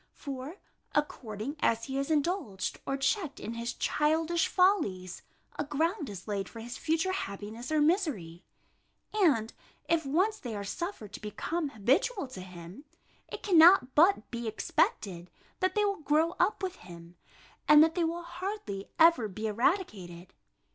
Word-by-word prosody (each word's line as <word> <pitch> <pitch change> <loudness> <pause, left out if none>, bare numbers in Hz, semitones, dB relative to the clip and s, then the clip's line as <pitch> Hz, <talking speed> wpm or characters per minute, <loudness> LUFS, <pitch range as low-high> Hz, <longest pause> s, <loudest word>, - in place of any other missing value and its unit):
For, 275 +3 -6 0.4
according 260 -2 -2
as 230 -4 +1
he 270 +2 -3
is 275 - -2
indulged 300 - -1
or 270 - 0
checked 315 +2 -1
in 225 - -5
his 235 +1 -4
childish 320 +3 +1
follies, 210 - +1 0.4
a - - +1
ground 305 - -1
is 195 -1 -9
laid 200 -2 -3
for 230 - -10
his 235 +2 -7
future 325 +4 0
happiness 220 - -5
or 310 -1 +3
misery; 290 - 0 0.7
and 290 - +2 0.3
if 330 -1 +2
once 375 +10 +1
they 235 -4 -6
are 200 - -4
suffered 225 - -5
to - - -8
become 285 - -3
habitual 275 - +1
to 190 -7 -8
him, 180 - -11 0.4
it - - -8
cannot 340 -7 +6
but 355 +6 +4
be 235 -1 -4
expected, 185 -4 -1 0.3
that 370 -1 0
they 420 0 +3
will 400 -5 -1
grow 310 +3 +2
up 385 +2 +1
with 370 -1 -3
him, 170 -1 -13 0.5
and 300 0 +9
that 325 0 +2
they 350 - 0
will 335 +1 -2
hardly 345 - -5
ever 325 -9 +5
be 215 +2 -6
eradicated. 205 - -1
280 Hz, 155 wpm, -30 LUFS, 210-340 Hz, 0.7 s, and